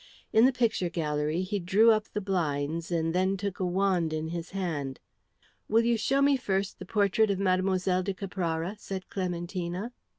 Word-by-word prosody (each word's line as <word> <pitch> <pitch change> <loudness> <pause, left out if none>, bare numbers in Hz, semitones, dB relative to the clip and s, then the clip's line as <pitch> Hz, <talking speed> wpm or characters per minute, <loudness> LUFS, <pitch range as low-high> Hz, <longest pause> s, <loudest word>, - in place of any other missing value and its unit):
In 220 +2 +7
the 265 - +5
picture 230 -8 0
gallery 155 0 -1
he 205 +2 -2
drew 200 +6 +5
up 215 -1 +2
the 210 - -4
blinds 165 -4 -1
and 165 -1 0
then 190 +2 +1
took 200 -1 -4
a 185 - 0
wand 180 -3 +1
in 155 +1 -2
his 170 +1 -5
hand. 160 -9 -3 0.7
"Will 225 +2 +4
you 235 0 +3
show 270 +5 +2
me 280 -1 +4
first 195 -5 -2
the 185 - -7
portrait 205 +2 +2
of 200 - +1
Mlle. 185 -1 +1
de 195 +1 -2
Caprara?" 180 -1 -3
said 190 -2 -6
Clementina. 180 +3 -3
185 Hz, 175 wpm, -28 LUFS, 170-205 Hz, 0.7 s, In